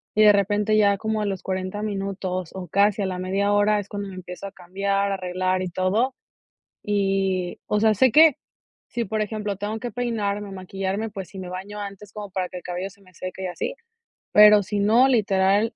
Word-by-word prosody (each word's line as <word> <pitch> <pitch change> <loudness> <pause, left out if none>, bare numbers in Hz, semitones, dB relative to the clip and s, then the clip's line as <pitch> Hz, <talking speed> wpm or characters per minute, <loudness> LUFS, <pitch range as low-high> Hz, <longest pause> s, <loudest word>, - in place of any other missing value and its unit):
y 215 - +5
de 210 - +9
repente 205 +1 +2
ya 200 -1 +4
como 220 +1 -2
a - - -1
los 195 -2 -3
40 185 +2 -3
minutos 195 -3 -3
o 180 -3 -7
casi 205 +3 +3
a - - 0
la 185 -1 -3
media 195 +2 0
hora 205 +1 +3
es 200 -1 -7
cuando 205 -1 -5
me 190 - -9
empiezo 180 +1 -8
a - - -9
cambiar, 195 +2 -1
a - - 0
arreglar 185 0 -1
y 185 - -2
todo. 200 +9 0 0.7
Y, 195 -3 0
o 210 - 0
sea, 220 -1 +5
sé 250 +5 +4
que 310 -1 +7 0.5
si, 240 - -2
por 220 +1 -3
ejemplo, 210 -2 -3
tengo 205 +3 -3
que 245 +1 -5
peinarme 210 -4 -2
o - - -10
maquillarme. 195 +3 -3
Pues 195 -3 -7
sí, - - -11
me 185 -1 -6
baño 195 +3 -7
antes 200 0 -8
como 210 -2 -7
para 185 -1 -2
que 180 - -8
el 180 - -9
cabello 180 +2 -4
se 200 +1 -21
me 185 -1 -21
seque 185 +2 -7
y - - -1
así, 185 - -4 0.6
pero 210 0 +8
si 205 +1 -2
no, 225 +6 +5
literal 205 -2 +2
200 Hz, 215 wpm, -24 LUFS, 185-210 Hz, 0.7 s, de